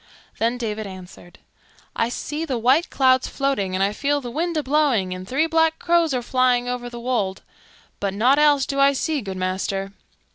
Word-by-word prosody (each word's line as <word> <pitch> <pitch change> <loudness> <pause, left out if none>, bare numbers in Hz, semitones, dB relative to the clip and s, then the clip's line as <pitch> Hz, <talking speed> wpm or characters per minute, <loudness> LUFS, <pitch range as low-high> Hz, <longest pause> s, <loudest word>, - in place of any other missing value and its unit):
Then 230 +2 +1
David 215 -3 -4
answered, 185 -2 -12 0.6
"I 230 - 0
see 300 +5 -4
the 270 -6 -2
white 260 +9 +3
clouds 260 -1 +3
floating 270 -10 -1
and 190 - +1
I 200 +1 +1
feel 290 +4 0
the 245 -3 -7
wind 335 +4 -2
a 305 - 0
blowing 260 -10 +1
and 185 0 -8
three 275 +8 +1
black 325 0 +2
crows 340 -2 +2
are 250 -2 -1
flying 250 -1 +2
over 245 -1 -4
the 240 0 -8
wold; 230 -6 -2 0.6
but 200 -1 -1
nought 255 +7 +3
else 290 -3 +4
do 275 - -3
I 275 0 +5
see, 300 +1 -1
good 190 -3 -6
master." 190 +1 -2
250 Hz, 190 wpm, -22 LUFS, 205-285 Hz, 0.6 s, I